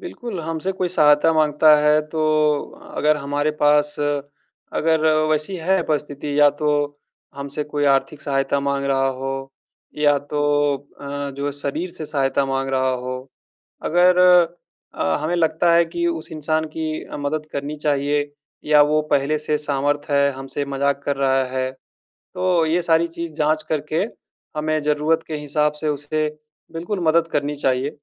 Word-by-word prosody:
बिल्कुल 240 - -6
हमसे 165 +3 -3
कोई 180 - +1
सहायता 150 -1 +4
माँगता 155 0 +5
है 150 +1 +4
तो 160 0 -3 0.8
अगर 150 0 +3
हमारे 145 +1 -1
पास 150 0 +3
अगर 145 +2 -2 0.2
वैसी 155 +5 0
है 180 +2 +1
परिस्थिति 145 -1 -2
या 145 - +8
तो 150 - +1 0.7
हमसे 140 +2 -4
कोई 145 0 -2
आर्थिक 140 +2 -2
सहायता 135 0 0
माँग 140 0 -1
रहा 135 0 +2
हो 135 0 -2 0.6
या 145 -1 +3
तो 145 0 0 0.6
अ, 140 0 -4
जो 140 0 -2
शरीर 145 +5 -3
से 155 - -6
सहायता 140 -1 0
माँग 135 0 -1
रहा 130 0 +1
हो, 125 0 -3 0.7
अगर 180 +2 +4 0.8
अ, 80 -1 0
हमें 165 +3 -1
लगता 165 +1 +2
है 170 0 +5
कि 170 +1 -3
उस 165 0 -4
इंसान 155 +1 -1
की 155 -1 -3
अ, - - -8
मदद 150 +2 -3
करनी 140 +2 -4
चाहिए 145 0 0 0.3
या 150 -1 +6
वो 155 - +3
पहले 140 +2 +2
से 150 0 0
सामर्थ्य 145 0 -1
है, 140 0 +3
हमसे 135 +2 -3
मज़ाक 140 0 -1
कर 140 - -1
रहा 135 -1 +2
है 130 0 -1 0.6
तो 180 -2 +1
ये 165 +3 +1
सारी 165 0 +2
चीज़ 170 -1 -6
जाँच 155 0 0
करके 155 +4 -1 0.5
हमें 155 0 0
ज़रूरत 150 +2 +1
के 155 - -4
हिसाब 150 0 0
से 155 - -1
उसे 150 +1 -1 0.4
बिल्कुल 175 +5 -4
मदद 165 +1 +3
करनी 145 +1 -1
चाहिए। 135 0 0
150 Hz, 155 wpm, -21 LUFS, 140-160 Hz, 0.8 s, या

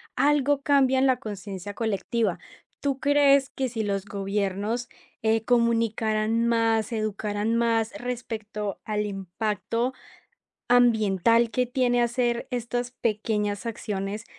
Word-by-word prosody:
algo 290 -1 +2
cambia 270 -2 +4
en 260 - +3
la 260 -2 +3
conciencia 205 -4 -7
colectiva. 220 -2 -1 0.4
¿Tú 275 -2 -1
crees 280 -1 +4
que 265 -1 -2
si 225 -1 -3
los 200 -1 -2
gobiernos, 200 +3 -2 0.3
eh, 220 0 +2
comunicaran 230 -1 +1
más, 225 -1 +2
educaran 215 0 -1
más 230 -1 +1
respecto 220 -4 -4
al 210 -1 -1
impacto 210 +5 -2 0.8
ambiental 230 -1 +4
que 250 +2 0
tiene 245 -1 +1
hacer 240 0 0
estas 245 0 -2
pequeñas 210 -3 -1
acciones, 210 -1 -4
225 Hz, 115 wpm, -26 LUFS, 210-245 Hz, 0.8 s, cambia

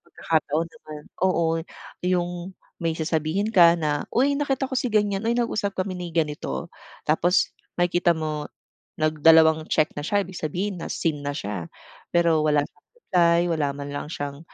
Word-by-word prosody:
pagkakataon 160 0 -1
naman. 155 -9 -11 0.2
Oo, 165 -3 +2 0.4
yung 180 0 -2 0.2
may 165 -1 0
sasabihin 160 +6 -1
ka 170 -4 +7
na," 150 -3 -2
Uy 270 +4 +2
nakita 280 -2 0
ko 265 - -6
si 250 - 0
ganyan, 205 -3 +1
uy 235 - +1
nag-usap 215 -4 -1
kami 185 0 -2
ni 180 -1 -5
ganito." 150 - -2 0.3
Tapos 175 +4 +2 0.2
makikita 175 -1 +2
mo 155 -1 -3 0.5
nagdalawang 160 0 +4
check 155 - +2
na - - -5
siya 200 +6 0
ibig 185 0 -10
sabihin 180 +4 -3
na-seen 160 -3 -2
na 145 0 -3
siya. 100 - -4 0.4
Pero 170 -2 +3
wala 150 -1 +2
siyang - - -18
reply, 170 - +3
wala 155 -3 0
man 140 0 -6
lang 145 - -5
siyang, 145 -2 -5
165 Hz, 155 wpm, -24 LUFS, 155-185 Hz, 0.5 s, ka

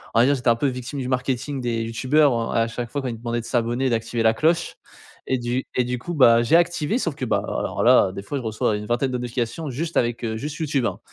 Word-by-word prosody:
on - - +5
va 120 - +6
dire 140 +2 +3
j'étais 125 -1 -5
un 115 - +5
peu 140 - 0
victime 125 +2 -4
du 125 - -3
marketing 130 +2 -2
des 115 -2 -1
youtubeurs, 125 +1 +2
heu - - -3
et - - +4
à 115 - +1
chaque 120 0 -5
fois 145 +3 -3
quand 130 - -3
ils 115 - -5
demandaient 120 +1 -3
de - - -12
s'abonner 120 +2 0
et - - +1
d'activer 115 0 -1
la 110 0 +5
cloche 165 +7 +1 0.5
et 130 - +1
du 120 +2 -2
et 125 - +3
du 125 0 -3
coup, 175 +7 -5
bah, 120 -5 +6
j'ai 120 +8 +3
activé 170 +2 +2
sauf 165 - -2
que, 135 - -4
bah, - - 0
alors - - -2
là, 95 - +5
des 100 - -7
fois 140 +8 -4
je 130 - -5
reçois 110 -1 0
une 105 - -6
vingtaine 125 +3 0
de 125 - -1
notifications 125 +5 -3
juste 155 +6 -3
avec, 120 0 0
heu, 110 -1 -2
juste 150 +4 -5
YouTube, 145 -5 0
hein, - - -2
125 Hz, 280 wpm, -23 LUFS, 115-140 Hz, 0.5 s, va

